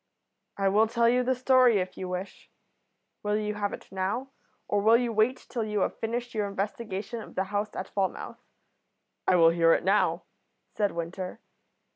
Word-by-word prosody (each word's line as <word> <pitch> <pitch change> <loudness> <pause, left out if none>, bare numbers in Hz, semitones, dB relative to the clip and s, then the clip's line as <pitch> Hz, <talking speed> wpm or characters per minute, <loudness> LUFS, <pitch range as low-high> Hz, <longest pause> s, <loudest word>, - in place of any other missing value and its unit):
"I 195 -1 +1
will 210 +3 +4
tell 235 +1 +2
you 250 +2 +4
the 255 +1 +1
story 255 -2 +5
if 185 -1 -2
you 185 - -5
wish. 185 +2 -6 0.7
Will 210 0 0
you 210 0 -2
have 205 -1 -2
it - - -9
now, 200 +8 -2 0.4
or 205 0 +1
will 225 +3 +6
you 240 -1 -1
wait 220 +4 +1
till 235 -3 -2
you 210 -2 -1
have - - -1
finished 240 +2 -3
your 210 -2 -1
investigation 205 +2 -4
of - - -12
the 190 - +1
house 205 +1 -1
at - - -4
Falmouth?" 195 -2 -3 0.8
"I - - +5
will 165 -2 +6
hear 165 -1 +4
it - - +1
now," 195 +3 +2 0.5
said 205 -2 +1
Winter. 180 +4 -5
210 Hz, 180 wpm, -28 LUFS, 190-230 Hz, 0.8 s, will